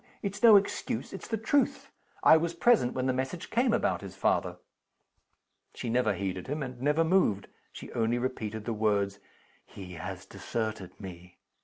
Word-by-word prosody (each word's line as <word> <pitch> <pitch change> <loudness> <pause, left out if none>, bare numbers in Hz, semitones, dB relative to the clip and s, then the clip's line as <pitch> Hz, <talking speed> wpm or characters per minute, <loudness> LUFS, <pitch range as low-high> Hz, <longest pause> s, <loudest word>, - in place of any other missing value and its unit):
It's 200 0 -4
no 230 -3 +9
excuse 200 0 0
it's - - -7
the 225 - -1
truth. 270 +6 0 0.3
I - - +8
was 165 +1 0
present 195 - +3
when 130 - -1
the 130 - +2
message 130 +7 -4
came 240 +1 +2
about 230 - +1
his 95 -1 -9
father." 95 - 0 1.2
She 120 - -4
never 115 -4 +2
heeded 95 -1 -4
him, 150 +2 -2
and 125 -2 -7
never 150 +4 +3
moved. 160 - +2 0.2
She - - -10
only 115 +1 +1
repeated 110 -4 -3
the 115 - -1
words 100 -2 0 0.4
"He 90 -2 -10
has 80 - -7
deserted 110 -5 -5
me!" 90 -2 -10
120 Hz, 165 wpm, -29 LUFS, 100-165 Hz, 1.2 s, no